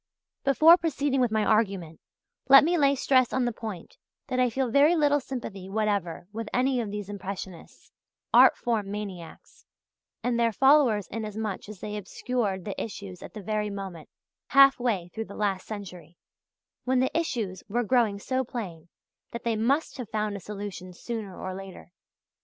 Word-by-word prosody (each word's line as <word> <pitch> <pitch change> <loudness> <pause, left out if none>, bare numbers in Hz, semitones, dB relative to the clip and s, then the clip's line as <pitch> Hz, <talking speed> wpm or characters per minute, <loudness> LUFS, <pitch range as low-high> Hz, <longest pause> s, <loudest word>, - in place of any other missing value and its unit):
Before 310 +5 +7
proceeding 290 -5 0
with 245 - +3
my 215 -1 +1
argument, 195 -7 0 0.5
let 275 +1 +10
me 340 +3 +2
lay 280 -4 +3
stress 255 -2 +3
on 260 -1 +1
the 240 - 0
point 215 -6 -8 0.3
that 255 -1 -1
I 250 -1 +3
feel 255 0 -1
very 290 +6 +5
little 290 -2 +3
sympathy 220 -8 -7
whatever 200 -5 -1
with 225 0 -5
any 255 0 +1
of 220 - -4
these 205 -1 -5
impressionists, 195 -3 -8 0.4
art - - +7
form 220 -4 -1
maniacs, 195 -6 -8 0.6
and 245 -1 0
their 230 -1 +3
followers 260 -5 +4
inasmuch 215 -2 -5
as 210 -4 -10
they 210 0 -4
obscured 205 -1 -3
the 200 - -4
issues 200 -4 -8
at - - -11
the 210 - -7
very 210 +1 -1
moment 195 -5 -7 0.4
half 275 0 +6
way 200 -8 -1
through 225 0 -4
the 200 - -11
last 195 -3 -1
century 180 -6 -9 0.7
when 255 0 +1
the 260 - 0
issues 225 - -2
were 240 +4 0
growing 225 -3 +2
so 260 +6 -1
plain 180 -10 -7 0.4
that 235 - -7
they 230 -1 0
must 270 +9 0
have 240 -4 -6
found 215 -1 -2
a - - -5
solution 200 -2 -7
sooner 210 -1 -6
or 185 - -5
later. 190 -1 -10
215 Hz, 170 wpm, -27 LUFS, 195-255 Hz, 0.7 s, let